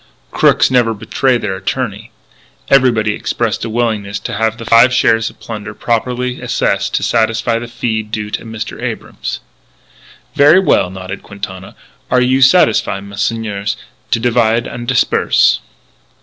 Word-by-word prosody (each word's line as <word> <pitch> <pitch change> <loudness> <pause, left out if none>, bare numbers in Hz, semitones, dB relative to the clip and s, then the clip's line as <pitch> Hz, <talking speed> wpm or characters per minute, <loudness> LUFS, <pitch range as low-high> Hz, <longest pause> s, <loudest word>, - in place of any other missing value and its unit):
Crooks - - +3
never 120 -3 +2
betray 130 +4 0
their 105 -4 -3
attorney. 95 0 -4 0.6
Everybody 120 -6 +3
expressed 115 0 -2
a 115 - -3
willingness 110 -3 -1
to - - -5
have 110 +1 0
the 115 - -8
five 115 +3 +6
shares 115 -2 +2
of - - -19
plunder 110 -1 -7
properly 125 +2 -2
assessed - - -1
to - - 0
satisfy 115 0 +1
the 120 - -7
fee 115 -2 -2
due 105 -1 -5
to - - -3
Mr. 110 -1 -7
Abrams. - - -5 0.9
"Ver' 150 +6 +6
well," 100 - +2
nodded 95 +1 -7
Quintana, 95 -2 -8 0.3
"are 125 - +3
you 130 +2 +2
satisfy, 130 - +4
messieurs, 100 0 -3 0.3
to 115 - +1
divide 115 -1 +1
an' 120 0 -7
disperse?" - - +3
115 Hz, 140 wpm, -15 LUFS, 105-120 Hz, 0.9 s, five